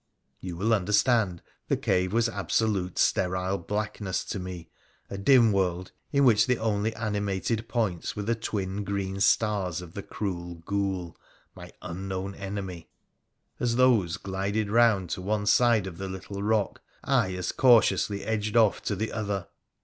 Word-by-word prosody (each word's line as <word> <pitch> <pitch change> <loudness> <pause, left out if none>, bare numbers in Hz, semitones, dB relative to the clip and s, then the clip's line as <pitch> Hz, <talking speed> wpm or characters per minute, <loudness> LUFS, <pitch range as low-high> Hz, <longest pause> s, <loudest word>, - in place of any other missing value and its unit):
You 90 -2 -6
will 110 +5 +1
understand 105 -2 +2 0.2
the - - +1
cave 90 -1 +1
was 115 +2 +2
absolute 100 -3 -1
sterile 95 +1 +1
blackness 100 0 -3
to 100 - -4
me, 90 -3 -7 0.4
a 100 - -4
dim 120 0 +5
world 90 -2 -1 0.2
in 140 -1 +3
which 115 -2 +5
the 125 -1 +2
only 110 0 -1
animated 105 +1 -2
points 110 -8 -1
were 105 - -3
the 115 +3 +1
twin 105 -3 -3
green 100 -1 -3
stars 100 -5 +2
of 90 -2 -10
the 100 - -5
cruel 90 -4 -5
ghoul, 95 -4 -2 0.4
my - - -11
unknown 95 +2 -4
enemy. 95 -4 -6 0.7
As 120 -2 0
those 120 -9 +3
glided 100 +2 -2
round 110 -7 +3
to 90 - -3
one 105 +2 -1
side 115 -2 +4
of 85 -3 -8
the 95 - -4
little 95 +1 -6
rock, 105 0 0 0.2
I 95 0 +1
as 90 -1 -2
cautiously 105 -5 +4
edged 110 0 -1
off 110 -3 +4
to 105 - 0
the 110 +3 -3
other. 100 -4 -3
100 Hz, 155 wpm, -27 LUFS, 95-110 Hz, 0.7 s, dim